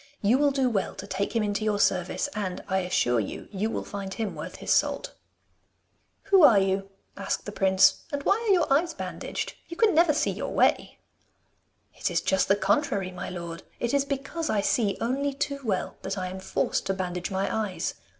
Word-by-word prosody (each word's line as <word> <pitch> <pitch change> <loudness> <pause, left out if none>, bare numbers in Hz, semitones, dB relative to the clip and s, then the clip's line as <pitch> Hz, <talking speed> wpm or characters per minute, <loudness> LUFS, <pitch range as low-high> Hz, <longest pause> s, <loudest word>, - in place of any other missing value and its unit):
You 230 +6 +4
will 290 0 +4
do 270 -2 +1
well 215 -6 -1
to - - -7
take 200 +3 -3
him 225 - +2
into 205 0 -1
your 210 -1 +1
service, 185 +3 +1
and, 190 -4 -4
I 190 -1 +1
assure 125 -10 +1
you, 105 - -5
you 210 +2 -1
will - - -3
find 195 -1 -6
him 215 0 -3
worth - - -7
his - - 0
salt.' - - 0 1.1
'Who 395 -2 +5
are 230 -8 +8
you?' 195 0 +1 0.3
asked 195 -1 -3
the 205 - -5
prince. 190 -1 +4
'And 285 -1 -3
why 395 +7 +3
are - - +4
your 345 -7 +3
eyes 325 +3 +1
bandaged? - - -4
You 335 - -8
can 450 -2 +4
never 330 0 +5
see 300 - +1
your - - -4
way!' - - +2 1.0
'It - - -2
is - - +1
just 190 - +1
the 195 - +4
contrary, 200 -2 0
my 180 0 -6
lord! 170 -1 -6 0.2
It 240 +1 -1
is 280 -1 +3
because 280 +4 -3
I 210 - +2
see 205 -1 +1
only 275 +4 -1
too 280 0 -2
well 200 -6 -2
that 195 +1 -4
I 185 -1 -3
am 190 +1 -7
forced 190 - -1
to 195 - 0
bandage 180 -1 -3
my 190 0 -1
eyes. 210 -4 -2
205 Hz, 205 wpm, -27 LUFS, 190-275 Hz, 1.1 s, are